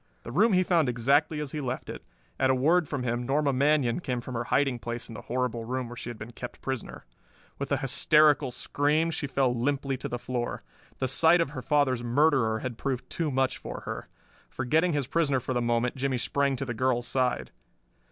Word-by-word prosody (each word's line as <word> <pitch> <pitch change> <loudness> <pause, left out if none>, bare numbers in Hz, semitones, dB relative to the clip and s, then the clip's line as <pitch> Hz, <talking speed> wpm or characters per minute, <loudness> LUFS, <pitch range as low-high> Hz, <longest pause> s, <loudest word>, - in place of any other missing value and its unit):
The 115 - -7
room 210 - +4
he 185 0 +4
found 170 -6 +2
exactly 140 +6 +2
as 150 -2 -4
he 150 - -4
left 130 -1 -4
it. - - -7 0.4
At 130 - +3
a 130 - +4
word 160 +6 +3
from 140 -3 -3
him 120 0 -1
Norma 140 +2 +1
Manion 140 -2 +2
came 125 -8 -2
from 125 +2 -7
her 120 0 -2
hiding 135 -2 +1
place 120 +2 -5
in 115 - -10
the - - -7
horrible 125 -2 -2
room 125 +1 -3
where 120 - -9
she 120 - -7
had 120 - -7
been 110 +3 -8
kept 125 +1 -8
prisoner. 130 -3 -5 0.5
With - - -4
an - - +3
hysterical 150 -3 +4
scream 150 +6 0
she 150 - -3
fell 130 -2 +1
limply 135 +2 -1
to - - -5
the 120 - -3
floor. 120 0 -4 0.3
The 130 - -1
sight 160 +6 +5
of 165 -5 0
her 140 -4 -6
father's 135 -4 +1
murderer 120 -3 +2
had 120 -3 -5
proved 135 -3 -3
too 165 -3 -1
much 130 -1 0
for - - -7
her. - - -6 0.4
Forgetting 155 +7 +1
his 145 -2 0
prisoner 145 -1 +1
for 130 - -3
the 120 - 0
moment 120 +1 0
Jimmie 135 -1 0
sprang 140 +3 0
to 135 - -4
the 120 - -3
girl's 120 +1 0
side. 125 0 -1
130 Hz, 215 wpm, -28 LUFS, 120-145 Hz, 0.5 s, sight